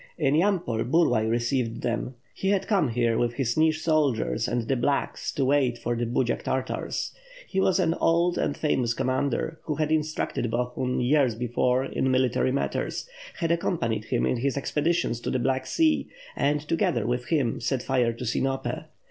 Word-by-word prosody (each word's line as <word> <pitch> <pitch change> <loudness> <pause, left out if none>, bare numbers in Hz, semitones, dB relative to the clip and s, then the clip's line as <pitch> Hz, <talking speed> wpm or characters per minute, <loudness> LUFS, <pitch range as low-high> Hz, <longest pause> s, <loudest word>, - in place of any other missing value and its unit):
In 140 -4 +2
Yampol, 165 - +1
Burlay 125 -6 +3
received 120 0 -1
them. 120 +2 -2 0.2
He 190 - -2
had 195 -1 +1
come 195 -8 +2
here 115 -1 +1
with 120 -1 +1
his 120 -2 0
Nij 155 +2 +3
soldiers 150 -8 +1
and 120 -1 -1
the 135 - +2
"blacks'' 140 +3 -1
to 135 - 0
wait 130 -3 +2
for 120 0 -2
the 120 0 -1
Budziak 120 +1 0
Tartars. 130 0 -2 0.3
He 190 - -1
was 190 - +3
an 165 -3 +2
old 170 +1 +2
and 145 - -1
famous 125 -6 0
commander, 140 +5 -1
who 155 - -1
had 155 +1 -1
instructed 155 -6 -1
Bohun, 125 +2 -1
years 130 -2 +3
before 125 +2 +1
in 130 - -1
military 130 0 +2
matters; 140 - -2 0.3
had 165 -1 -1
ac 170 0 +1
companied 115 - -1
him 120 +1 0
in 125 - +1
his 135 +3 -1
expeditions 150 -2 0
to - - -4
the - - 0
Black 130 +1 0
Sea, 320 -2 +2 0.3
and, 145 +1 +1
to - - +1
gether 120 -8 +1
with 125 +1 -1
him, 140 -8 +1
set 125 +1 -1
fire 125 -3 +2
to 120 +2 -7
Sinope. 135 +3 -1
130 Hz, 180 wpm, -26 LUFS, 120-155 Hz, 0.3 s, Burlay